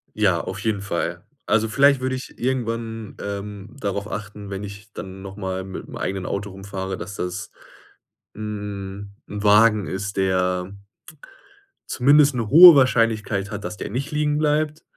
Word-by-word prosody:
Ja, 95 -6 +2
auf - - -5
jeden 105 -2 -1
Fall. 90 -4 -3 0.2
Also, 110 +1 +2
vielleicht 140 +4 +4
würde 130 0 -1
ich 130 - -8
irgendwann, 115 -3 -3
ähm, 100 +1 -6
darauf 100 -1 -3
achten, 105 -1 -7
wenn 100 +1 -5
ich 100 +2 -10
dann 95 -2 -8
noch 95 0 -9
mal 95 -2 -3
mit'm 95 0 -8
eigenen 95 -1 -3
Auto 100 +1 -3
rumfahre, 95 0 -5
dass 90 +4 -7
das 90 +4 -4 0.8
'n 100 -2 -6
'n 105 0 -5
Wagen 105 0 +5
ist, 100 +1 -4
der 90 -1 0 1.2
zumindest 145 +2 +4
'ne 115 -4 -2
hohe 170 +4 +11
Wahrscheinlichkeit 115 -6 +2
hat, 105 -1 -5
dass 105 - -5
der - - -5
nicht 135 +7 -4
liegenbleibt. 150 +1 0
105 Hz, 150 wpm, -22 LUFS, 95-115 Hz, 1.2 s, hohe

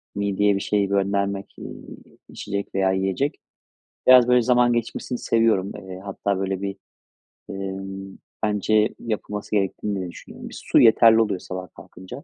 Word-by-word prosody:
mideye 100 0 +1
bir - - -1
şey 105 -1 +1
göndermek, 100 0 -1
eee, - - -8 0.6
içecek 100 -1 -5
veya 95 -1 +2
yiyecek. 95 - -1 0.7
Biraz, 125 -1 +8
böyle, 125 0 +5
zaman 120 0 +3
geçmesini 120 +1 -3
seviyorum. 115 -5 +1
Eee, 95 -1 -9
hatta, 100 0 -2
böyle, 95 0 -2
bir, 100 -1 -3 0.7
emm, 95 0 -6 0.3
bence 105 +1 +1
yapılması 105 -2 -5
gerektiğini 100 0 -1
de 90 -2 -5
düşünüyorum. - - -11
Bir - - -10
su - - +3
yeterli 115 0 +6
oluyor 105 -4 0
sabah 90 0 -7
kalkınca. 95 +9 -11
100 Hz, 140 wpm, -23 LUFS, 95-110 Hz, 0.7 s, Biraz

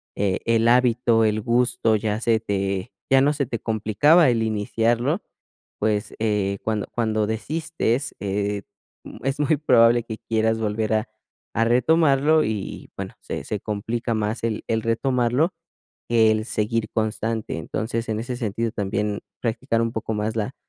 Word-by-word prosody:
e 100 -2 0
el 115 0 +3
hábito, 120 -2 +4
el 110 0 +1
gusto, 115 -1 +2
ya 105 0 -2
se 115 -1 +2
te 100 0 -2 0.2
ya 135 0 +6
no 145 +2 +3
se 140 -2 -1
te 115 -2 -4
complicaba 115 - +4
el 115 -2 +1
iniciarlo, 115 - 0 0.6
pues, 105 -1 0
eh, 105 -3 0
cuando 110 -2 -1
cuando 110 -2 0
desistes, 135 +2 -2
eh, 100 0 -1 0.6
es 135 +1 -1
muy 150 +1 +2
probable 120 -4 +4
que 110 -1 -6
quieras 110 0 0
volver 110 0 -1
a 110 +2 0 0.4
a 115 - +2
retomarlo, 150 +4 +4
y - - -1 0.4
y, - - -19
bueno, - - -6
se - - -5
se 105 - -3
complica 115 +3 -2
más 110 +1 -1
el 110 -2 -2
el 110 0 0
retomarlo, 125 +7 +1 0.6
que 115 -2 +4
el 110 0 -1
seguir 110 0 -1
constante. 110 -2 -2
Entonces, 115 +7 -3
en 110 - -1
ese 125 +2 -4
sentido 115 -1 -2
también 105 0 -2 0.2
practicar 115 0 0
un 115 - -1
poco 110 0 -3
más 105 +1 -2
la 110 +5 -2
115 Hz, 155 wpm, -23 LUFS, 110-120 Hz, 0.6 s, ya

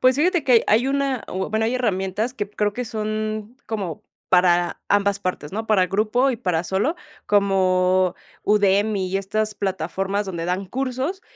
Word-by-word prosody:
pues 255 0 +4
fíjate 345 +2 +2
que 245 -4 +4
ha - - +2
hay 235 +5 +3
una 275 -2 0
o 190 +1 -3
bueno, 220 +1 +1
hay 240 - 0
herramientas 210 0 -1
que 205 -4 -4
creo 210 0 0
que 250 +4 -4
son 215 +1 -3
como 195 -8 -4 0.3
para 175 -1 +3
ambas 200 -1 +2
partes, 180 -6 -4
¿no?, 220 +2 -4
para 190 -4 +4
grupo 215 +7 +2
y 235 - -3
para 180 -7 -1
solo, 200 - 0 0.3
como 185 -2 +2 0.3
Udemy 205 -1 +2
y 190 - -1
estas 215 +2 -2
plataformas 195 +1 -2
donde 170 -3 -4
dan 180 +3 -2
cursos, 265 - -3
205 Hz, 170 wpm, -22 LUFS, 190-230 Hz, 0.3 s, pues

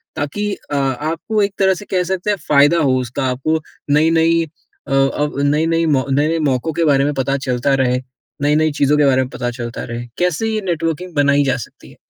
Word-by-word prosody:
ताकि 205 +9 -2 0.2
अ, - - -1
आपको 155 - -1
एक 200 0 -1
तरह 190 -1 +4
से 195 +3 -8
कह 185 -2 +2
सकते 185 +2 -2
हैं 205 - +1
फ़ायदा 145 +3 +5
हो 135 -4 +2
उसका? 125 +2 -3
आपको 135 +5 -1 0.3
नई-नई 165 +2 +3 0.4
अ, 135 - -3
अब 135 +1 +1
नई-नई 165 +3 +2
मौ 140 -5 +1
नए-नए 150 +4 +1
मौकों 130 +5 -1
के 170 - 0
बारे 140 -2 +3
में 145 - 0
पता 135 0 -1
चलता 125 +2 +1
रहे, 125 0 +1 0.4
नई-नई 150 +2 +2
चीज़ों 145 +1 +4
के 150 - +4
बारे 130 -1 +3
में 130 - -3
पता 120 -2 -3
चलता 120 -1 -6
रहे, 120 0 -6
कैसे 180 +4 0
ये 220 -1 -1
नेटवर्किंग 170 0 -2
बनाई 145 0 +3
जा 135 -1 0
सकती 120 - -11
है? - - -17
145 Hz, 205 wpm, -18 LUFS, 135-165 Hz, 0.4 s, फ़ायदा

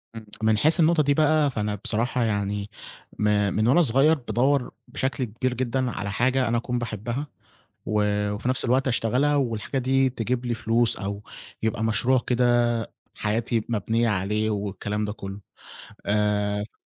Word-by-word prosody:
إمم، 110 - -8 0.2
من 110 -1 +3
حيث 155 +7 +3
النقطة 160 -1 +4
دي 140 0 +2
بقى، 155 -1 +3
فأنا 105 -3 -2
بصراحة 115 +4 0
يعني 100 -1 -2 0.5
ما 105 -1 +2
من 110 +4 +1
وأنا 140 +8 +5
صغيّر 140 +3 +4
بادوّر 130 0 0 0.2
بشكل 130 0 -2
كبير 125 +2 -2
جدًا 125 0 -1
على 100 -2 -4
حاجة 130 +3 +1
أنا 120 - +1
أكون 120 +1 -2
باحبّها 120 +5 -4 0.6
و 105 -1 +1 0.3
وفي 115 +5 -3
نَفْس 130 - +2
الوقت 130 +3 +2
أشتغلها 130 +4 +1
والحاجة 125 -1 -1
دي 130 +1 +2
تجيب 125 +1 -3
لي 120 - 0
فلوس 115 +1 +2
أو 100 +1 -5 0.4
يبقى 110 0 -1
مشروع 115 +4 +3
كده 125 0 +2 0.7
حياتي 110 +1 -1
مبنيّة 115 +1 0
عليه 105 +2 0
والكلام 105 0 -3
ده 105 - -4
كُلّه. 100 -2 -8 0.7
آآ 105 0 +1
ف 105 - -13
115 Hz, 155 wpm, -25 LUFS, 105-130 Hz, 0.7 s, وأنا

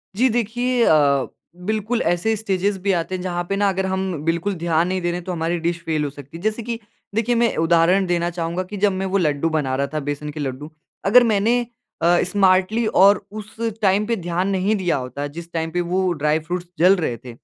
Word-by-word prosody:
जी, 250 +5 +3
देखिए 240 +2 0
अ, 140 -3 +3 0.4
बिल्कुल 220 +3 -1
ऐसे 195 +6 +1
स्टेजेज़ 200 -1 -1
भी 200 +1 0
आते 170 +3 -3
हैं 180 - -5
जहाँ 175 -1 -2
पे 195 - 0
ना 200 0 +2
अगर 190 0 -1
हम 190 -5 -2
बिल्कुल 170 +4 0
ध्यान 170 0 +1
नहीं 185 0 -1
दे 175 - 0
रहे 175 - -2
हैं, 180 - -7
तो 185 - -3
हमारी 170 0 -1
डिश 170 +1 -1
फ़ेल 155 -2 0
हो 145 - -1
सकती 145 +3 -11
है। - - -11
जैसे 215 +2 -1
कि 235 0 -4 0.4
देखिए 235 +2 +1
मैं 235 0 +2
उदाहरण 170 +4 +3
देना 175 -1 0
चाहूँगा 170 +1 -3
कि 205 +3 -8
जब 205 +1 +3
मैं 195 - -1
वो 200 - +4
लड्डू 155 -2 +1
बना 145 -5 -1
रहा 140 +1 0
था, 155 - 0
बेसन 145 +1 -4
के 155 - -8
लड्डू, 145 +2 -5 0.3
अगर 240 +5 +7
मैंने 235 +4 +2 0.4
अ, 175 +1 +4
स्मार्टली 190 +4 +2
और 200 0 +6
उस 215 0 -9 0.3
टाइम 200 +1 +3
पे 235 - +1
ध्यान 175 +2 -1
नहीं 195 +2 +1
दिया 185 -4 0
होता 130 +2 -5
जिस 170 0 -11
टाइम 160 -1 -2
पे 175 +1 0
वो 185 0 +1
ड्राई 150 +1 +2
फ्रूट्स 175 +1 -3
जल 185 +3 +6
रहे 140 -10 -2
थे। 125 - -8
180 Hz, 225 wpm, -21 LUFS, 165-205 Hz, 0.4 s, अगर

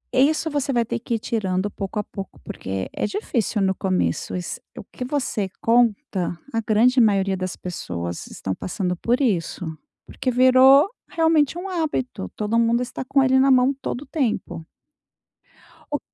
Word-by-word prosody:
E 270 +3 +6
isso 315 +1 -1
você 285 -1 -1
vai 235 -2 +2
ter - - -3
que 235 0 -2
ir 225 - -2
tirando, 200 -3 -1
pouco 195 +1 -5
a 210 - 0
pouco, 195 -1 -9
porque 95 0 -4
é - - -1
difícil 235 - -1
no 190 0 +2
começo. 185 -1 -1
Iss 180 - -5 0.2
o - - -6
que 255 - -8
você 250 -7 -2
conta, 225 - +1
a 225 - +1
grande 240 +4 +4
maioria 195 -3 +3
das 185 0 -4
pessoas 85 - -5
estão 95 - -4
passando 180 - -3
por 240 +8 0
isso. 190 -8 0 0.4
Porque 255 - -3
virou 260 +5 +6 0.2
realmente 325 -2 +2
um 375 +2 -5
hábito, 295 - -2
todo 215 +2 0
mundo 235 +1 +2
está 255 - -6
com 270 +1 +2
ele 265 0 +4
na 270 +1 +4
mão 260 +1 +5
todo 245 - -3
o - - -15
tempo. 235 - -2 1.3
O 290 - +1
230 Hz, 170 wpm, -23 LUFS, 190-265 Hz, 1.3 s, E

